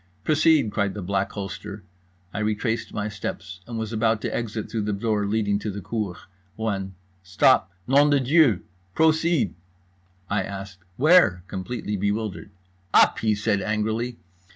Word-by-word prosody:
"Proceed!" 155 -4 +3
cried 100 -2 -1
the 105 - -5
Black 100 +1 -1
Holster. 100 0 -6 0.5
I 100 - -3
retraced 110 +2 -1
my 105 -1 -3
steps, 95 -2 -6
and 120 -1 -5
was 110 0 -4
about 110 0 +2
to - - -3
exit 110 -2 -3
through 110 - -3
the 105 0 -1
door 105 0 0
leading 100 -1 +1
to 105 - -4
the 100 0 -5
cour, 105 -3 -3 0.4
when 95 -4 -3 0.3
"Stop! 90 -1 +3
Nom 140 +3 +5
de 145 -1 +4
Dieu! 135 - +4 0.3
Proceed!" 160 - +2 0.7
I 100 -1 0
asked 95 -1 -7 0.2
"Where?" 150 - +5
completely 105 +2 -4
bewildered. 105 +1 -2 0.5
"Up," - - +6
he 110 -2 +1
said 100 -1 0
angrily. 110 +3 -1
105 Hz, 150 wpm, -24 LUFS, 100-115 Hz, 0.7 s, Up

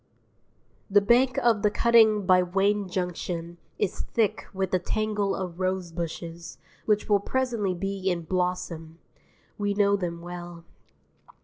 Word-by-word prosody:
The 205 +1 +6
bank 240 +5 +3
of 230 -4 +3
the 210 - +3
cutting 220 -2 +4
by 185 -1 +5
Wayne 195 +2 +1
Junction 175 -1 -4 0.2
is 190 - -2
thick 215 -2 -1
with 190 -1 -3
a 185 - +3
tangle 210 +1 -1
of 180 -2 -5
rosebushes 170 -2 -4 0.3
which 210 -1 +2
will 205 -2 +4
presently 230 -4 -1
be 195 +1 -2
in 175 -2 -1
blossom; 170 -2 -3 0.6
we 205 -1 0
know 200 0 +3
them 170 -3 -4
well. 175 -1 -8
190 Hz, 130 wpm, -26 LUFS, 175-210 Hz, 0.6 s, The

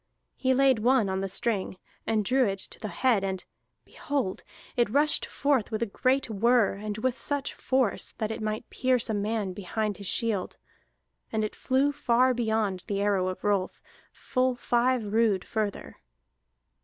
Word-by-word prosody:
He 260 -1 +1
laid 265 -3 +4
one 240 -2 +3
on 190 0 -1
the 195 - -2
string, 195 -1 -1 0.3
and 215 -2 +1
drew 260 +2 +3
it 195 0 -1
to - - -7
the 215 - -4
head, 230 -2 +1
and 190 -1 -3 0.4
behold! 275 -10 -3 0.3
it 240 -3 +2
rushed 290 +6 +3
forth 280 -6 +1
with 220 0 -1
a - - +1
great 255 +6 +1
whir, 230 0 +3
and 205 +1 -5
with 245 +2 0
such 285 0 -2
force 260 -5 0
that 215 0 -2
it 220 - -5
might 215 0 -3
pierce 255 -3 +1
a - - -1
man 205 -1 -1
behind 205 +2 -3
his 200 - -8
shield. 215 -2 -1 0.7
And 220 -1 0
it 215 - -3
flew 270 +2 +1
far 255 -2 +3
beyond 220 -5 -1
the 200 -1 -1
arrow 200 -2 +1
of 185 - -5
Rolf, 200 -3 0 0.3
full 255 0 0
five 245 -1 +1
rood 220 -5 +2
further. 215 -3 -3
220 Hz, 165 wpm, -27 LUFS, 200-255 Hz, 0.7 s, laid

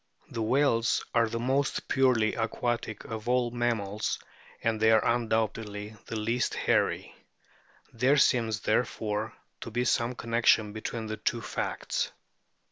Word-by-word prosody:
The 115 - -3
whales 115 0 +2
are 115 -1 +3
the 115 - -3
most 135 +4 0
purely 125 -5 +3
aquatic 115 -1 -2
of 110 +1 -5
all 125 -1 +2
mammals, 110 -4 -1 0.5
and 115 -1 +1
they 110 0 +4
are 110 -1 +5
undoubtedly 110 -2 -1
the 115 - -5
least 115 +3 0
hairy; - - +1 0.8
there 130 +5 +3
seems, 115 -6 +3
therefore, 110 -1 -1 0.2
to - - -6
be 120 +2 -1
some 120 -1 +1
connection 115 -3 +2
between 110 +1 -4
the 110 0 -4
two 115 +2 -1
facts. - - -2
115 Hz, 130 wpm, -29 LUFS, 110-120 Hz, 0.8 s, are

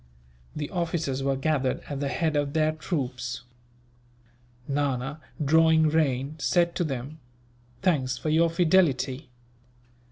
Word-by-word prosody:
The 150 -1 -4
officers 165 -6 -1
were 135 0 +1
gathered 135 -1 0
at 140 -2 -4
the 140 - -1
head 155 +2 0
of 145 -1 0
their 155 -1 +2
troops. 135 -7 -4 1.2
Nana, 140 +1 -1 0.2
drawing 160 +1 +5
rein, 145 -2 0
said 170 +1 +2
to - - +1
them: 140 +1 -5 0.6
"Thanks 140 -8 +1
for 155 - -3
your 165 +2 +4
fidelity. 160 -6 +2
150 Hz, 120 wpm, -26 LUFS, 135-160 Hz, 1.2 s, drawing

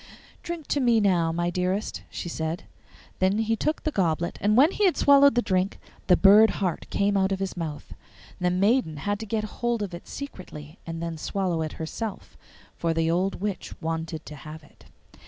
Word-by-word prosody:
'Drink 340 -3 -6
to 290 - 0
me 240 -4 +4
now, 175 -5 +2
my 175 +1 -1
dearest,' 185 +4 -2
she - - -6
said. 160 0 -3 0.6
Then 190 +2 +2
he 225 0 +1
took 305 +8 -1
the 310 - 0
goblet, 170 - 0
and 210 +3 +3
when 295 +7 +6
he 415 - +1
had 365 - +3
swallowed 280 -2 +6
the 240 - +2
drink 185 +1 0 0.3
the 180 - +6
bird 210 +2 +7
heart 185 -4 -2
came 200 0 +1
out 190 0 +2
of 195 - +1
his 195 -1 -3
mouth. 160 -4 -6 0.5
The 180 -1 +2
maiden 195 - +2
had 205 +7 -2
to 220 - -6
get 215 +1 -1 0.2
hold 240 -2 0
of 190 -3 -5
it 170 - -9
secretly 175 - -9
and 165 0 -5
then 165 -2 -4
swallow 180 -2 -1
it 155 -1 -3
herself, 200 +6 -6 0.4
for 165 -1 -1
the 165 0 +1
old 185 +3 0
witch 205 -2 -4
wanted 160 -1 -4
to 150 - -9
have 155 +2 -10
it. 145 - -21
185 Hz, 195 wpm, -26 LUFS, 165-220 Hz, 0.6 s, bird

